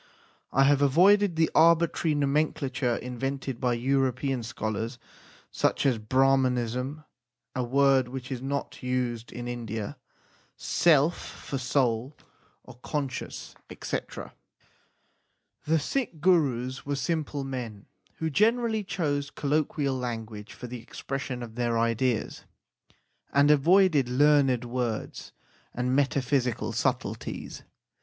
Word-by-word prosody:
I 135 - +4
have 140 0 +4
avoided 180 +7 +5
the 160 0 +2
arbitrary 165 -1 +4
nomenclature 140 -3 0
invented 135 +1 -4
by 125 -2 +2
European 130 +1 0
scholars, 115 0 -4 0.5
such - - 0
as 130 -5 +2
Brahmanism, 130 +3 +1 0.5
a 125 - 0
word 135 0 +3
which 130 +1 -7
is 125 -2 -3
not 140 +1 -4
used 125 -2 -2
in 120 0 -6
India; 115 -3 -5 0.6
self 160 0 +3
for 135 - -6
soul 125 0 0 0.5
or 125 -1 -14
con 145 -2 -2
science, - - -7 0.3
&c. - - -1 1.7
The 160 +2 +3
Sikh 175 - -2
Gurus 135 -7 +2
were 145 0 -2
simple 145 0 -2
men 120 -6 -6 0.3
who 160 -1 -3
generally 225 - +2
chose 145 -7 -2
colloquial 145 -1 0
language 115 -4 -5
for - - -9
the 125 -1 -7
expression 130 +1 -5
of 115 -2 -9
their 120 0 0
ideas, 115 +1 0 0.9
and 145 +1 +5
avoided 155 -2 +4
learned 135 -2 +3
words 120 -2 -3 0.4
and 125 +1 0
meta 140 -1 +2
physical 125 -3 0
subtleties. - - -3
135 Hz, 115 wpm, -27 LUFS, 120-145 Hz, 1.7 s, avoided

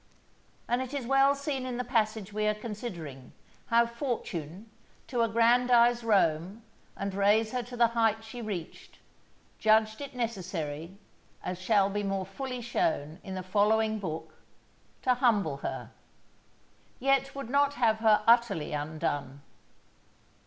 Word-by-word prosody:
And 245 +1 +1
it 260 +2 -5
is 270 -4 -3
well 270 +2 +4
seen 280 -2 -3
in 255 -1 -4
the 250 - -1
passage 220 -4 -1
we 215 0 0
are 215 - +2
considering, 185 - -7 0.3
how 235 0 +4
Fortune, 225 - -5 0.4
to 245 -2 -1
aggrandize 235 +1 +4
Rome, 195 -1 +1 0.3
and 200 0 -3
raise 210 +3 +3
her 250 - -1
to 245 +1 -9
the 235 -1 +5
height 225 -1 +1
she 230 +2 -8
reached, 195 -7 -7 0.6
judged 220 +2 +3
it 280 -2 -7
necessary, 185 -7 -4 0.5
as 180 0 -4
shall 200 0 +3
be 205 +1 -2
more 195 -1 -2
fully 250 +6 -5
shown 235 - -1
in 190 - -6
the 185 - -4
following 215 +3 +2
Book, 160 -5 -5 0.7
to 255 - +4
humble 210 - +2
her; - - -5 1.1
yet 275 +1 +1
would 275 -4 -6
not 285 0 +3
have 230 -4 +2
her 220 -1 +4
utterly 230 -11 +3
undone. 145 -2 -3
220 Hz, 140 wpm, -29 LUFS, 190-245 Hz, 1.1 s, the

